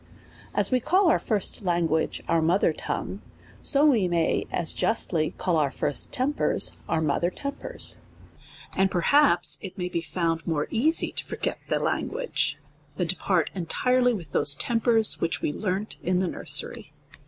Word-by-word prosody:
As -, -, +3 dB
we 255 Hz, -, +3 dB
call 350 Hz, -, +3 dB
our -, -, +2 dB
first 210 Hz, -2 st, +1 dB
language 170 Hz, -4 st, 0 dB
our 165 Hz, -1 st, +2 dB
mother 170 Hz, +5 st, +2 dB
tongue, -, -, -5 dB, 0.4 s
so 285 Hz, +2 st, +4 dB
we 235 Hz, -11 st, +4 dB
may 170 Hz, -2 st, 0 dB
as 170 Hz, -, +1 dB
justly 165 Hz, -8 st, +1 dB
call 170 Hz, -3 st, 0 dB
out 145 Hz, -3 st, 0 dB
first 145 Hz, -4 st, 0 dB
tempers 270 Hz, +3 st, +1 dB
our 160 Hz, -, +1 dB
motiicr 160 Hz, +4 st, 0 dB
tem 280 Hz, -1 st, -3 dB
pers; -, -, -5 dB, 0.8 s
and 190 Hz, 0 st, +2 dB
perhaps 180 Hz, -, +3 dB
it 190 Hz, -, -8 dB
may 180 Hz, -1 st, -3 dB
be 170 Hz, -2 st, -2 dB
found 165 Hz, -1 st, -2 dB
more 155 Hz, -3 st, -1 dB
easy 305 Hz, +9 st, +2 dB
to -, -, -4 dB
for -, -, -6 dB
get -, -, -3 dB
the -, -, +2 dB
language, -, -, -2 dB, 0.4 s
than 175 Hz, -2 st, -1 dB
to 185 Hz, -, +1 dB
part 180 Hz, -3 st, 0 dB
entirely 250 Hz, +8 st, +1 dB
with 170 Hz, -8 st, -8 dB
those 140 Hz, +1 st, +2 dB
tem 230 Hz, +8 st, 0 dB
pers 225 Hz, -1 st, +2 dB
which 165 Hz, +1 st, -1 dB
we 145 Hz, -, 0 dB
learnt 200 Hz, +3 st, -3 dB
in 180 Hz, +1 st, 0 dB
the 185 Hz, 0 st, 0 dB
nursery. -, -, -3 dB
180 Hz, 170 wpm, -26 LUFS, 165-235 Hz, 0.8 s, so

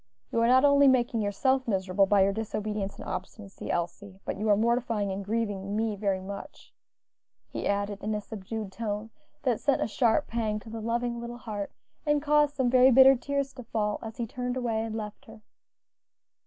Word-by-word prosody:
You 230 Hz, -, +1 dB
are 230 Hz, -, +4 dB
not 260 Hz, +3 st, +6 dB
only 280 Hz, 0 st, +6 dB
making 240 Hz, -3 st, +3 dB
yourself 260 Hz, +6 st, +1 dB
miserable 195 Hz, -1 st, +2 dB
by 200 Hz, -1 st, +5 dB
your 195 Hz, +1 st, +2 dB
disobedience 210 Hz, -2 st, -3 dB
and -, -, -9 dB
obstinacy, 195 Hz, +1 st, -7 dB
Elsie, 185 Hz, +3 st, -3 dB
but -, -, -2 dB
are 210 Hz, -1 st, +2 dB
mortifying 230 Hz, -3 st, +1 dB
and 195 Hz, +1 st, -4 dB
grieving 205 Hz, -2 st, -2 dB
me 220 Hz, -1 st, 0 dB
very 195 Hz, -2 st, 0 dB
much," 200 Hz, +1 st, -9 dB, 0.8 s
he -, -, -3 dB
added 200 Hz, 0 st, -1 dB
in 215 Hz, +1 st, -1 dB
a -, -, -1 dB
subdued 215 Hz, 0 st, -6 dB
tone, 215 Hz, +1 st, -4 dB, 0.3 s
that 245 Hz, -5 st, +1 dB
sent 280 Hz, -2 st, +2 dB
a -, -, +1 dB
sharp 235 Hz, +5 st, +2 dB
pang 220 Hz, -2 st, -1 dB
to 220 Hz, -, -11 dB
the 225 Hz, 0 st, -5 dB
loving 235 Hz, +1 st, -1 dB
little 240 Hz, 0 st, -6 dB
heart, 210 Hz, -4 st, -5 dB, 0.3 s
and 295 Hz, -1 st, +2 dB
caused 295 Hz, 0 st, +3 dB
some 260 Hz, -2 st, +1 dB
very 255 Hz, 0 st, +7 dB
bitter 265 Hz, +1 st, +8 dB
tears 280 Hz, +2 st, -2 dB
to 250 Hz, -, -9 dB
fall, 210 Hz, -2 st, -1 dB
as 225 Hz, 0 st, -8 dB
he 235 Hz, -, -2 dB
turned 250 Hz, +2 st, -4 dB
away 230 Hz, -3 st, -1 dB
and 225 Hz, -1 st, -4 dB
left 215 Hz, +4 st, -6 dB
her. 220 Hz, -2 st, -14 dB
225 Hz, 190 wpm, -28 LUFS, 205-245 Hz, 0.8 s, bitter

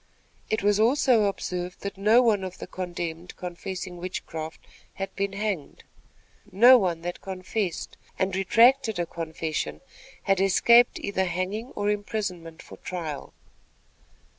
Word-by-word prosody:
It 220 Hz, -, -1 dB
was 205 Hz, 0 st, +3 dB
also 240 Hz, -1 st, +4 dB
observed 180 Hz, -2 st, -3 dB
that 200 Hz, -, -5 dB
no 215 Hz, +5 st, +5 dB
one 210 Hz, -5 st, +2 dB
of 185 Hz, -1 st, -6 dB
the -, -, -7 dB
condemned 175 Hz, -1 st, -5 dB
confessing 180 Hz, 0 st, -6 dB
witchcraft 165 Hz, -3 st, -6 dB, 0.3 s
had 195 Hz, 0 st, -5 dB
been 200 Hz, 0 st, -2 dB
hanged. 200 Hz, -7 st, -4 dB, 0.7 s
No 240 Hz, +7 st, +8 dB
one 175 Hz, -5 st, -1 dB
that 175 Hz, 0 st, -5 dB
confessed, 190 Hz, -1 st, -4 dB, 0.2 s
and 190 Hz, 0 st, 0 dB
retracted 230 Hz, +3 st, +4 dB
a 175 Hz, -, 0 dB
confession, 160 Hz, -1 st, -4 dB, 0.4 s
had 195 Hz, -1 st, +2 dB
escaped 235 Hz, +5 st, +5 dB
either 190 Hz, -2 st, -1 dB
hanging 185 Hz, +6 st, -3 dB
or 205 Hz, 0 st, 0 dB
imprisonment 195 Hz, -6 st, -4 dB
for -, -, -12 dB
trial. 165 Hz, -6 st, -6 dB
190 Hz, 130 wpm, -26 LUFS, 175-210 Hz, 0.7 s, No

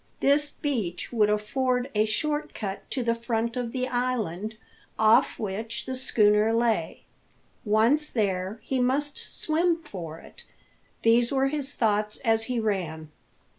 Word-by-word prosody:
This 290 Hz, +1 st, +3 dB
beach 235 Hz, -, -3 dB
would 215 Hz, -3 st, +3 dB
afford 250 Hz, +4 st, 0 dB
a 215 Hz, 0 st, +3 dB
short 295 Hz, +8 st, -1 dB
cut 195 Hz, -2 st, -5 dB
to 260 Hz, -, -2 dB
the 230 Hz, 0 st, +2 dB
front 230 Hz, 0 st, -2 dB
of 245 Hz, -2 st, -3 dB
the 255 Hz, 0 st, -2 dB
island, 220 Hz, -5 st, -2 dB, 0.4 s
off 220 Hz, +1 st, +4 dB
which 220 Hz, +2 st, -4 dB
the 260 Hz, -, -4 dB
schooner 215 Hz, -4 st, +3 dB
lay. 225 Hz, -8 st, 0 dB, 0.6 s
Once 235 Hz, +8 st, +3 dB
there, 195 Hz, -1 st, -1 dB
he 265 Hz, -, -1 dB
must 280 Hz, +4 st, 0 dB
swim 335 Hz, +2 st, 0 dB
for 170 Hz, -, -7 dB
it. -, -, -14 dB, 0.6 s
These 235 Hz, +1 st, +4 dB
were 270 Hz, 0 st, +2 dB
his 285 Hz, -1 st, -3 dB
thoughts 210 Hz, -2 st, +1 dB
as 225 Hz, -1 st, +2 dB
he 250 Hz, -1 st, -1 dB
ran. 170 Hz, -8 st, -2 dB
230 Hz, 140 wpm, -26 LUFS, 210-260 Hz, 0.6 s, off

